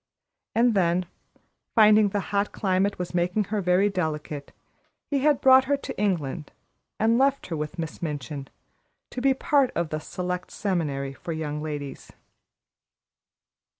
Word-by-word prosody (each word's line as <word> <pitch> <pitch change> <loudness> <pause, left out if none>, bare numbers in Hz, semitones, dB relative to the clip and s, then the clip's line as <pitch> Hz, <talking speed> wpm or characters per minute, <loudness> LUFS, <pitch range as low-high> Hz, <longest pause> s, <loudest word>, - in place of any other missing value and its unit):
And 235 +1 +4
then, 180 -2 +2 0.7
finding 215 -1 +6
the 205 - -1
hot 200 0 +1
climate 195 0 0
was 180 -1 -5
making 180 +4 +1
her 210 - +1
very 180 +2 +3
delicate, 155 -6 -3 0.6
he 280 - +2
had 290 0 +3
brought 260 0 +7
her 285 +1 +1
to - - -7
England 165 -6 -1 0.5
and 225 +2 +3
left 275 +1 +2
her 165 - -2
with 150 +3 -5
Miss 165 -2 -5
Minchin, 145 -3 -4 0.6
to 250 - -4
be 270 0 +3
part 275 -1 +2
of 170 -1 -1
the 155 - -2
Select 180 +3 -4
Seminary 145 -8 -2
for 165 +5 -6
Young 150 -1 -3
Ladies. 145 -3 -6
180 Hz, 145 wpm, -26 LUFS, 155-215 Hz, 0.7 s, brought